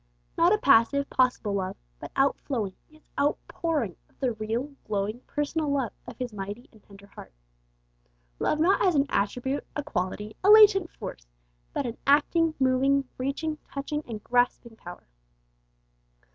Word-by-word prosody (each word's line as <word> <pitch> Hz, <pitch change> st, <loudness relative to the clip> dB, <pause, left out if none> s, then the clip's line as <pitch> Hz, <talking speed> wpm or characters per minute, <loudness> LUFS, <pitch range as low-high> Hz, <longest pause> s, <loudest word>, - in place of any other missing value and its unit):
Not 340 Hz, +2 st, +4 dB
a 425 Hz, -, +4 dB
passive, 280 Hz, -, +4 dB
possible 250 Hz, -5 st, +1 dB
love, 190 Hz, -2 st, -2 dB, 0.2 s
but -, -, -8 dB
outflowing, 260 Hz, -6 st, 0 dB, 0.2 s
yes, 310 Hz, 0 st, -21 dB, 0.2 s
outpouring 290 Hz, -, -1 dB
of -, -, -33 dB
the 260 Hz, -3 st, +1 dB
real, 225 Hz, +6 st, -3 dB, 0.2 s
glowing, 210 Hz, +2 st, -2 dB
personal 295 Hz, +1 st, -1 dB
love 270 Hz, -6 st, -1 dB
of -, -, -9 dB
His 250 Hz, -3 st, -4 dB
mighty 205 Hz, +4 st, -6 dB
and 220 Hz, -, -20 dB
tender 200 Hz, 0 st, -16 dB
heart. 200 Hz, -, -13 dB, 1.1 s
Love 305 Hz, -, 0 dB
not 355 Hz, +5 st, +3 dB
as 365 Hz, -4 st, +3 dB
an 280 Hz, -1 st, +3 dB
attribute, 250 Hz, +7 st, -1 dB
a 295 Hz, -, -2 dB
quality, 210 Hz, -3 st, -3 dB
a 395 Hz, -, +4 dB
latent 415 Hz, -4 st, +7 dB
force, -, -, -9 dB, 0.4 s
but -, -, -2 dB
an 235 Hz, -1 st, -4 dB
acting, 310 Hz, +3 st, +3 dB
moving, 270 Hz, +1 st, +2 dB
reaching, 300 Hz, +4 st, -2 dB
touching, 285 Hz, +2 st, -3 dB
and 215 Hz, -3 st, -7 dB
grasping 245 Hz, -1 st, 0 dB
power. 175 Hz, -5 st, -11 dB
265 Hz, 145 wpm, -27 LUFS, 215-295 Hz, 1.1 s, latent